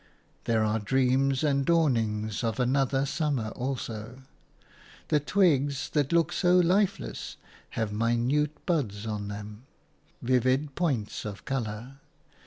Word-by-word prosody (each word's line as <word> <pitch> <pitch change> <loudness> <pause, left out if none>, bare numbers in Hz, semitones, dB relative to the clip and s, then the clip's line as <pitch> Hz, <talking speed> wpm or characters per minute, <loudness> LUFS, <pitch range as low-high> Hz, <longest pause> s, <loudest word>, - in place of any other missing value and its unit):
There 115 -2 +2
are 110 +1 +1
dreams 130 +4 +2
and 140 -2 +2
dawnings 115 -10 +1
of 115 +1 -1
another 135 +2 +2
summer 140 -6 -1
also. 125 -1 -5 0.9
The 150 - +4
twigs 145 -5 +2
that 145 -3 +1
look 170 0 +2
so 180 -1 +3
lifeless 180 - +1 0.4
have 110 -2 -1
minute 120 +7 0
buds 115 - -1
on 105 -2 -3
them, 105 +3 -8 0.5
vivid 130 +3 +1
points 135 -12 -1
of 105 -2 -7
colour. 125 +1 -4
130 Hz, 115 wpm, -28 LUFS, 110-145 Hz, 0.9 s, The